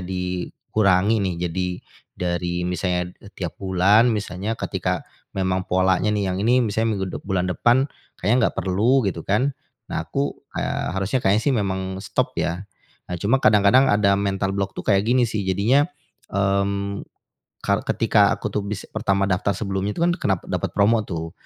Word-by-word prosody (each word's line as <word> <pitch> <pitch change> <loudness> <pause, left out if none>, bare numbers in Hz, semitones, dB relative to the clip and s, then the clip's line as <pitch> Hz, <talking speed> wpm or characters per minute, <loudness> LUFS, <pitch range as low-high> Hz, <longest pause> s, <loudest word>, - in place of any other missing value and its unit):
dikurangi 95 +3 0
nih, 95 -3 -1 0.2
jadi 90 +2 -1 0.5
dari 85 0 -2
misalnya 90 -1 -1
e - - -13
tiap 90 -3 -5
bulan, 95 +4 +4
misalnya 105 0 -2
ketika - - -2 0.3
memang 95 -1 -1
polanya 95 +2 +2
nih 100 -2 0
yang 90 - -2
ini 125 +3 +4
misalnya 110 +1 0
minggu 95 -1 -2
dep - - -6
bulan 95 -2 0
depan 120 +8 +3 0.3
kayaknya 105 +7 +2
enggak - - -26
perlu, 110 +8 +2
gitu 85 -4 -2
kan. 130 +8 +1 0.3
Nah, - - -3
aku, 140 0 -2 0.2
eee, - - -2
harusnya 110 +7 -1
kayaknya 100 +3 +3
sih 135 - +3
memang 95 -2 -2
stop, 100 -2 -1
ya. 90 +4 -2 0.4
Nah, 90 - -4
cuma 115 +7 +3
kadang-kadang 110 +3 +5
ada 100 -1 +3
mental 95 -1 -1
block 100 0 -2
tuh - - -5
kayak 100 -2 +4
gini 125 +1 +3
sih, 105 -2 -2
jadinya, 115 - +3 0.5
mmm, 100 0 0 0.6
kal - - +2
ketika - - +3
aku - - -4
tuh 105 - -1
bis 105 0 -4
pertama 100 -3 0
daftar 90 +2 +1
sebelumnya 100 -1 -2
itu - - -4
kan 175 0 +4
kena 95 -2 +1
pat - - -16
dapat - - -2
promo, 110 +1 +3
tuh. 80 -3 -5
100 Hz, 170 wpm, -23 LUFS, 95-110 Hz, 0.6 s, kadang-kadang